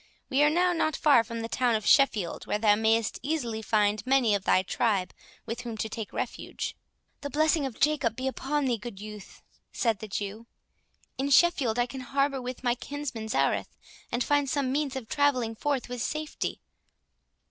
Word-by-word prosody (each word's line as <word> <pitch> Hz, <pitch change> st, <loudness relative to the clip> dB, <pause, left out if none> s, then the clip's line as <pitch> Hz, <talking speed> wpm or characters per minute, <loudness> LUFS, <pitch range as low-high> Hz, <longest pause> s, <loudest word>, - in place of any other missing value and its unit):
We 270 Hz, +2 st, +3 dB
are 295 Hz, -, +6 dB
now 355 Hz, +3 st, +2 dB
not 315 Hz, -3 st, 0 dB
far 280 Hz, -7 st, +5 dB
from 230 Hz, 0 st, -6 dB
the 225 Hz, -, -3 dB
town 240 Hz, 0 st, +1 dB
of 215 Hz, -, -2 dB
Sheffield, 220 Hz, -, +3 dB
where -, -, 0 dB
thou 210 Hz, -1 st, +4 dB
mayest 220 Hz, +1 st, +1 dB
easily 245 Hz, -6 st, -2 dB
find 210 Hz, -1 st, +1 dB
many 255 Hz, -4 st, +3 dB
of 200 Hz, -2 st, -1 dB
thy 185 Hz, -, +4 dB
tribe 195 Hz, -2 st, 0 dB, 0.3 s
with 230 Hz, +2 st, -4 dB
whom 235 Hz, -3 st, -6 dB
to 220 Hz, -, -2 dB
take 220 Hz, -1 st, -6 dB
refuge." -, -, -4 dB, 0.5 s
"The 285 Hz, -, -4 dB
blessing 310 Hz, -1 st, +2 dB
of 250 Hz, -, -10 dB
Jacob 280 Hz, -7 st, +2 dB
be 255 Hz, -, -4 dB
upon 285 Hz, +2 st, -1 dB
thee, 240 Hz, -4 st, 0 dB
good 210 Hz, -2 st, -8 dB
youth!" 210 Hz, -1 st, -10 dB, 0.3 s
said 225 Hz, -4 st, 0 dB
the 215 Hz, -, -7 dB
Jew; 210 Hz, +3 st, -5 dB, 0.7 s
"in 275 Hz, +1 st, 0 dB
Sheffield 275 Hz, -6 st, +4 dB
I 240 Hz, -, +3 dB
can 265 Hz, +1 st, -7 dB
harbour 275 Hz, +1 st, 0 dB
with 250 Hz, +1 st, -6 dB
my 245 Hz, -1 st, +3 dB
kinsman 255 Hz, -3 st, -5 dB
Zareth, -, -, 0 dB, 0.3 s
and 240 Hz, +1 st, 0 dB
find 290 Hz, 0 st, +1 dB
some 270 Hz, -2 st, 0 dB
means 285 Hz, -1 st, -1 dB
of 260 Hz, -4 st, -5 dB
travelling 265 Hz, -6 st, +1 dB
forth 275 Hz, +3 st, -1 dB
with 245 Hz, -1 st, -5 dB
safety." 305 Hz, +5 st, -3 dB
245 Hz, 185 wpm, -28 LUFS, 220-280 Hz, 0.7 s, are